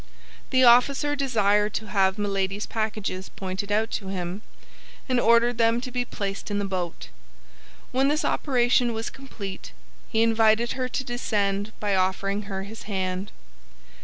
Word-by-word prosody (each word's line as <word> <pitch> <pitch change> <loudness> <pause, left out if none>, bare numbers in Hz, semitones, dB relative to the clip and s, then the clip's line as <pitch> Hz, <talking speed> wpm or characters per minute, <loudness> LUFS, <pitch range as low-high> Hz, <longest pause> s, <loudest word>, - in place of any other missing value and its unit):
The 260 0 +4
officer 275 +4 +5
desired 210 -6 +2
to 220 -2 -4
have 190 -1 +2
Milady's 200 0 -1
packages 215 -4 -3
pointed 190 +2 -5
out 220 +2 +1
to 195 - -4
him, 185 +1 -4 0.7
and 255 -2 +2
ordered 235 +1 +4
them 230 +1 +3
to 255 +1 -6
be 245 0 -1
placed 200 -4 -5
in 205 - -1
the 205 - -1
boat. 180 -3 -4 0.8
When 265 +2 +2
this 300 +2 +1
operation 245 -3 +2
was 225 0 -3
complete, 205 -8 -8 0.4
he 220 - +2
invited 225 +1 +3
her 255 -1 -2
to 265 - -2
descend 210 -4 -1
by 205 -1 0
offering 195 +2 0
her 190 -1 -3
his 220 +2 -10
hand. 190 0 -2
215 Hz, 150 wpm, -25 LUFS, 195-240 Hz, 0.8 s, officer